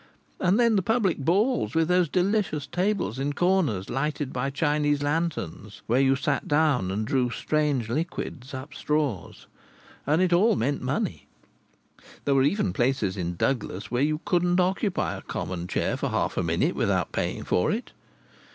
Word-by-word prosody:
And 185 +4 +2
then 230 -3 +4
the - - +3
public 205 -4 +1
balls, 200 - +1
with 165 -1 +3
those 180 -2 +3
delicious 185 -5 0
tables 180 - -1
in 145 +2 -1
corners, 165 - +1
lighted 145 +1 -2
by 125 +2 -1
Chinese 145 0 +1
lanterns, 145 - -3
where 125 +4 +2
you 135 0 +4
sat 140 +2 -1
down 145 -10 +2
and 105 +3 -2
drew 125 +1 +1
strange 145 0 0
liquids 135 -1 -4
up 140 +2 -7
straws. 150 - -2 0.6
And 150 +3 +3
it 185 -1 +3
all 210 +5 +4
meant 140 +2 -1
money. - - -2 1.0
There 140 - +3
were 135 - +4
even 195 +8 +1
places 120 -7 0
in 90 -2 -3
Douglas 105 -3 -2
where 125 +1 +1
you 155 +2 +1
couldn't 180 -2 +2
occupy 190 +2 0
a - - -9
common 90 -1 -4
chair - - -1
for - - -2
half - - -1
a - - 0
minute - - +1
without - - 0
paying - - -2
for - - +1
it. - - -3
150 Hz, 165 wpm, -26 LUFS, 130-180 Hz, 1.0 s, then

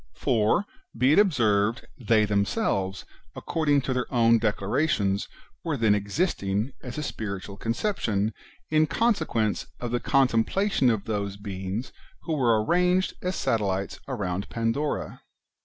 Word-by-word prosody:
For, 115 - +2 0.3
[be 130 +5 +4
it - - +6
observed,] 115 - +2
they 110 -3 +2
themselves, 100 - 0 0.3
according 145 -3 +1
to 130 0 -2
their 125 -1 -2
own 115 -2 +4
declarations, 105 -1 0 0.4
were 160 -4 -1
then 110 -3 +3
existing, 105 - -1
as 125 +1 -7
a 150 - -2
spiritual 100 -6 -5
concep 120 - -2
tion, 105 0 0 0.4
in 155 0 +4
consequence 150 - 0
of 120 -1 -4
the 120 - +1
contemplation 135 - +2
of 110 -4 0
those 100 -2 -3
beings 100 +3 -5 0.3
who 165 - -2
were 115 -6 +2
arranged 180 +3 +2
as 180 0 -2
satellites 100 -6 -1
around 100 -6 -3
Pandora. 115 +6 -2
115 Hz, 130 wpm, -26 LUFS, 100-145 Hz, 0.4 s, it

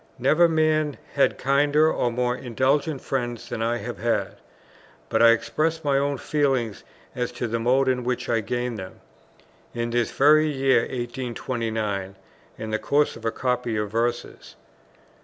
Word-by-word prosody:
Never 155 +7 +4
man 155 -2 +1 0.2
had 140 - +2
kinder 145 +3 +3
or 120 - 0
more 125 +1 0
indulgent 135 +4 0
friends 120 -3 -3
than 110 - -4
I 115 +1 0
have - - -6
had; - - -1 0.7
but 110 - +1
I 115 - +8
expressed 155 +8 0
my 140 -1 +3
own 140 0 -1
feeling 135 -9 0 0.4
as 125 -1 -3
to - - -3
the 115 +1 -2
mode 130 +3 +2
in 125 -1 +1
which 125 0 -2
I 115 - +1
gained 120 0 -3
them, 95 - -9 0.7
in 120 0 -2
this 120 -1 +1
very 155 +2 +4
year 135 -3 +3
1829, 115 -5 -3 0.4
in 110 - -6
the 110 - 0
course 145 +6 +1
of 115 - -11
a 115 - +1
copy 125 -3 -1
of 105 -1 -2
verses. 120 +2 -3
125 Hz, 160 wpm, -24 LUFS, 115-140 Hz, 0.7 s, I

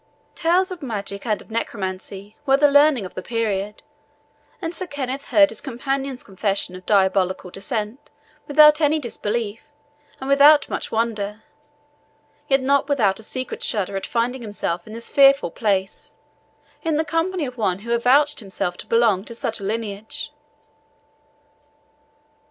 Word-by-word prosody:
Tales 360 +3 +1
of 360 -2 -7
magic 205 -4 -5
and 215 -2 +1
of - - -20
necromancy 200 -2 -4
were 270 0 +5
the 290 0 +4
learning 285 -6 +5
of 185 - -9
the - - -5
period, 210 -2 -2 0.8
and 330 -1 -4
Sir 370 +1 -4
Kenneth 275 -2 -4
heard 295 -1 +6
his - - -4
companion's 270 0 -3
confession 195 -1 -2
of 185 0 -12
diabolical 190 -2 +2
descent 215 +5 -4 0.4
without 300 +1 +6
any 300 +1 +3
disbelief, 225 -4 -3 0.6
and 265 - -6
without 285 +2 +6
much - - -4
wonder; 220 -2 -2 1.0
yet 270 -1 +3
not 280 +2 +2
without 220 -9 +2
a - - -10
secret 255 +3 -5
shudder 200 -2 -2
at 195 - -3
finding 245 +2 -1
himself 205 -5 -4
in 215 - -9
this 230 +1 -5
fearful 275 0 +5
place, 195 -4 -2 0.7
in 320 -3 0
the 315 - 0
company 330 +2 -1
of 250 -1 -7
one 195 -6 0
who 235 - -1
avouched 275 +5 +3
himself 190 -3 -3
to - - -9
belong 225 -5 +3
to 235 - -9
such 225 -1 -3
a - - -9
lineage. 215 0 -4
230 Hz, 150 wpm, -22 LUFS, 200-280 Hz, 1.0 s, heard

